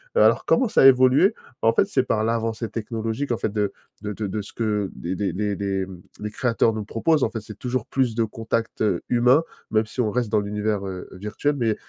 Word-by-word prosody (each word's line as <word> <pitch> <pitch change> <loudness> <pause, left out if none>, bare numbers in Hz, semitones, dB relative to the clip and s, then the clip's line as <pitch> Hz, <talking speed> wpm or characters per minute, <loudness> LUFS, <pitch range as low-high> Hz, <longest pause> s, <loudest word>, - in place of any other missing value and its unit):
Alors, 485 - +4
comment 260 - +3
ça 215 - +4
a - - +8
évolué? 130 - +6 0.3
En 115 0 +4
fait, 155 - +3
c'est 135 -10 +1
par 110 -3 0
l'avancée 115 0 -1
technologique, 115 +3 -3
en - - -1
fait, 110 - -1
de 105 -2 -1 0.3
de 105 0 -4
de 105 +1 -4
de 105 +2 -3
ce 100 - -11
que 105 -4 -1
des 90 +2 -4
des 100 -4 -1
des 100 +1 -1
des, 95 -1 -1
mmh, 90 -2 -11 0.2
des 105 0 -4
créateurs 115 -1 +2
nous 110 -1 -4
proposent, 150 +7 +2
en - - -1
fait. 110 - -5
C'est 105 0 -11
toujours 125 -2 -2
plus 130 -4 0
de 115 - +2
contacts, 115 +1 -3
heu, 100 -5 +1
humains, 125 +6 +4 0.3
même 110 0 +2
si 120 - -10
on 115 -3 +2
reste 120 0 -1
dans 105 0 +2
l'univers, 105 0 -2
heu, 95 -1 -7
virtuel. 105 +10 -2
Mais 115 -4 +1
il - - -1
110 Hz, 235 wpm, -23 LUFS, 105-120 Hz, 0.3 s, a